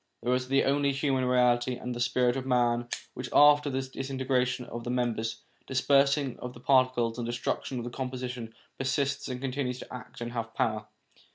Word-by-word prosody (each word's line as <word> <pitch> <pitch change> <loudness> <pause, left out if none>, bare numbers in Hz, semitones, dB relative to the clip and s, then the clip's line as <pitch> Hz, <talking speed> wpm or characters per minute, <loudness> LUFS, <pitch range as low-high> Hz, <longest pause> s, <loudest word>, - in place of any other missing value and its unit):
There 125 - +2
is 125 +1 -1
only 140 +1 +3
the - - -5
human 135 -2 +1
reality 125 0 +3
and 125 0 -5
the 120 - -6
spirit 125 0 +2
of 135 - -2
man 120 -2 +1 0.3
which, 125 0 -6
after 145 0 +6
the 135 0 -1
disintegration 130 -1 -1
of 120 0 -7
the 120 - -5
members, 115 -2 -1 0.3
dispersing 140 0 +2
of 125 0 -6
the - - -11
par 130 0 +4
ticles, 120 -2 -2
and 120 - -2
the - - -1
destruction 120 +2 -2
of 120 - -3
the 120 - -5
composition, 125 -3 -5 0.2
persists, 140 +1 0
and 125 -1 -4
continues 130 -1 -2
to - - -10
act 125 - -9
and 120 0 -4
to - - -11
have 115 -1 -4
power. 110 -2 0
125 Hz, 200 wpm, -29 LUFS, 120-135 Hz, 0.3 s, after